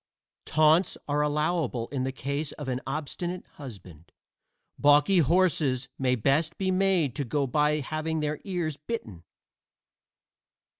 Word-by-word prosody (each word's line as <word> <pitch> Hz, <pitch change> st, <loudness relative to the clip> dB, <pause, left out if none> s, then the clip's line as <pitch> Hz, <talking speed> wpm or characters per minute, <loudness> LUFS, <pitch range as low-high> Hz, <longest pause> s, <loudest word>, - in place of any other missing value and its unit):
Taunts 155 Hz, +3 st, +3 dB
are 145 Hz, 0 st, +1 dB
allowable 150 Hz, -5 st, 0 dB
in 130 Hz, -2 st, -2 dB
the 135 Hz, -, -1 dB
case 140 Hz, +3 st, -3 dB
of 145 Hz, -, -8 dB
an 130 Hz, 0 st, -2 dB
obstinate 165 Hz, +5 st, -4 dB
husband: 95 Hz, -, -11 dB, 0.7 s
balky 145 Hz, +6 st, +5 dB
horses 150 Hz, -6 st, +2 dB
may 130 Hz, -1 st, +2 dB
best 145 Hz, +8 st, +1 dB
be 190 Hz, -1 st, 0 dB
made 185 Hz, -8 st, +2 dB
to 145 Hz, -, -1 dB
go 140 Hz, +2 st, 0 dB
by 150 Hz, +3 st, +1 dB
having 155 Hz, +2 st, -2 dB
their 150 Hz, 0 st, -2 dB
ears 175 Hz, -7 st, -3 dB
bitten. 125 Hz, -, -6 dB
150 Hz, 130 wpm, -27 LUFS, 135-160 Hz, 0.7 s, balky